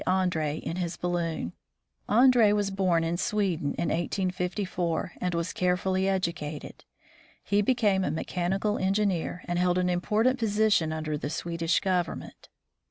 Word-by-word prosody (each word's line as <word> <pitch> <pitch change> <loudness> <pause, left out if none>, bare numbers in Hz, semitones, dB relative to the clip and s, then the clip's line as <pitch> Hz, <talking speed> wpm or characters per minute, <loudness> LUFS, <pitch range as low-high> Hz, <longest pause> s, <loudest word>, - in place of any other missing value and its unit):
Andree 180 -5 +1
in 165 - -5
his 175 -2 -3
balloon. 170 - -2 0.6
Andree 235 -1 +6
was 205 -1 0
born 185 -4 +2
in 165 +1 -1
Sweden 185 -6 0
in - - -1
1854, 180 -1 -1
and 180 -1 -1
was 170 +1 -2
carefully 185 +1 +1
educated. 170 -6 -3 0.6
He 205 0 +2
became 205 -4 +2
a - - 0
mechanical 185 +6 -1
engineer, 190 -2 0
and 175 0 -1
held 180 0 +2
an 180 0 +1
important 220 +8 +1
position 210 -7 +2
under 155 -1 -3
the 145 - -3
Swedish 165 +1 -1
government. 180 -3 -2
180 Hz, 135 wpm, -28 LUFS, 170-195 Hz, 0.6 s, Andree